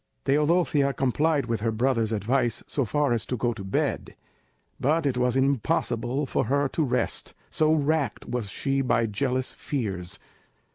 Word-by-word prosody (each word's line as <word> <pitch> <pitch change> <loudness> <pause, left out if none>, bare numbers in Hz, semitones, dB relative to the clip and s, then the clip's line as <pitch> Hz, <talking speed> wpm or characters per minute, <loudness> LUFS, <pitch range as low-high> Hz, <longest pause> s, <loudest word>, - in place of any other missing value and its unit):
Teodosia 150 -1 +2
complied 140 +2 +1
with 115 -3 -2
her 115 0 +1
brother's 115 -1 +1
advice 115 +3 0
so 140 - -1
far 145 +2 +1
as 115 -2 0
to 125 - -2
go 120 +1 0
to 105 -4 -8
bed, 95 - -2 0.6
but 155 +4 +1
it 135 -3 +1
was 125 +1 +1
impossible 130 0 0
for - - 0
her 140 +1 +1
to 160 - 0
rest, 125 -3 -1 0.2
so 155 0 +3
racked 150 -5 0
was 120 -4 -2
she 135 +5 0
by 120 -3 +2
jealous 130 +4 -1
fears. 100 -8 -3
130 Hz, 155 wpm, -26 LUFS, 115-140 Hz, 0.6 s, so